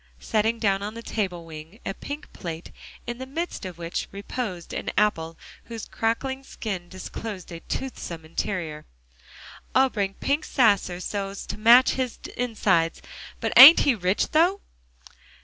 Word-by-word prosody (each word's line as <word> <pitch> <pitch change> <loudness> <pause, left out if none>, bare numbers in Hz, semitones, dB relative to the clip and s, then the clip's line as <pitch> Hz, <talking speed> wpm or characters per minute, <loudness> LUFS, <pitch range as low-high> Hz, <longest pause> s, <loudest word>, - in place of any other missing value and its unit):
setting 220 - 0
down 200 -3 +1
on 210 +2 -5
the 230 - -8
table 185 -8 -3
wing 160 +5 -11
a - - -2
pink 285 +9 -8
plate 165 -1 -7 0.3
in 240 0 -5
the 260 - -5
midst 325 - -4
of 180 -2 -9
which 170 0 -4
reposed 200 -3 -5
an - - -3
apple 165 -6 +1 0.3
whose 230 -2 -7
crackling 265 +4 -2
skin 195 -9 -6
disclosed 190 0 -7
a 170 - -7
toothsome 170 -11 -5
interior. 160 -2 -4 0.9
"I 265 +1 +5
bring 200 -4 -1
a - - -11
pink 285 +3 +1
sasser 200 -8 +2
so's 195 0 -4
to - - -6
match 235 +4 +7
his 255 -2 -2 0.2
insides. 205 -9 +1 0.4
But - - -2
ain't 290 +6 +12
he 280 - +4
rich, 185 -2 0
though!" 355 +6 +3
210 Hz, 150 wpm, -25 LUFS, 175-245 Hz, 0.9 s, ain't